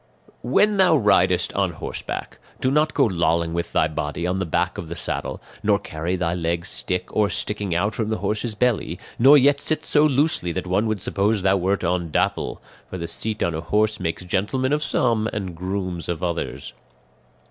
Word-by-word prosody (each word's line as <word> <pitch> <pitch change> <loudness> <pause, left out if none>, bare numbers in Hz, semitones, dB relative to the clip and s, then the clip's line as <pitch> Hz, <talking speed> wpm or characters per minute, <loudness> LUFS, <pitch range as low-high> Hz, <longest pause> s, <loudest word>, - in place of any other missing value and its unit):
"When 210 0 +3
thou 185 -4 +5
ridest 95 -5 +3
on 95 -3 0
horseback, - - -6 0.2
do 130 - +1
not 150 +2 +2
go 140 - +4
lolling 85 -4 +1
with 85 0 -3
thy - - +3
body 75 +2 -3
on 90 +1 0
the 95 - -2
back - - -1
of 80 - -7
the 85 - -5
saddle, - - -3 0.2
nor - - +3
carry 80 +4 -3
thy 85 -2 -1
legs 85 0 -2
stiff 90 0 -1
or 105 -1 +2
sticking 105 -5 -1
out 100 +5 +1
from 110 +3 -2
the 110 - 0
horse's 110 +1 -2
belly, 125 0 0 0.2
nor 135 +5 +8
yet 140 +1 +4
sit 155 - 0
so 150 - +3
loosely 145 - +2
that 95 - -3
one 95 +5 +1
would 110 -4 -2
suppose 100 0 0
thou 95 0 +4
wert 95 +2 0
on 90 -1 0
Dapple; - - -1 0.3
for 95 - -5
the 85 - -4
seat 110 +3 -2
on 85 - 0
a 80 - -3
horse 105 +4 +1
makes 90 0 -3
gentlemen 130 +9 0
of 150 - +1
some 115 -6 +1
and 95 -4 -4
grooms 90 -1 -4
of 85 0 -3
others. 85 -6 -3
95 Hz, 195 wpm, -23 LUFS, 85-110 Hz, 0.3 s, nor